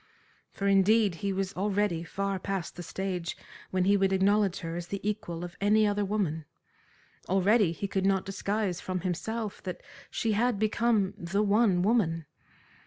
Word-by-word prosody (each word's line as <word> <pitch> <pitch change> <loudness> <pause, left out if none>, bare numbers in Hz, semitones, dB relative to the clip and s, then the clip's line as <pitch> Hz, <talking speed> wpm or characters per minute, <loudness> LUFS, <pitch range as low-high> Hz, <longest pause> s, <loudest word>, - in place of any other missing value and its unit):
For, 200 - -5
indeed, 200 +1 +4
he 200 -1 0
was 195 0 -2
already 200 -3 0
far 195 +3 -2
past 195 -2 -4
the 175 - -7
stage 180 0 -4 0.3
when 185 -1 +1
he 200 +1 +5
would 195 -1 +2
acknowledge 195 0 +2
her 165 -1 -4
as 175 0 -5
the 200 - -4
equal 190 -5 -3
of 175 0 -7
any 215 +2 +4
other 205 0 +1
woman. 190 -7 -1 0.8
Already 195 0 +4
he 200 +4 -4
could 190 0 0
not 195 -1 +2
disguise 195 -1 -2
from 185 -1 -3
himself 210 +4 -3
that 180 -2 -6 0.3
she 225 - -1
had 230 +2 +2
become 215 -1 +1
the 200 +3 0
one 205 -3 +3
woman. 180 -7 +1
195 Hz, 165 wpm, -29 LUFS, 180-210 Hz, 0.8 s, he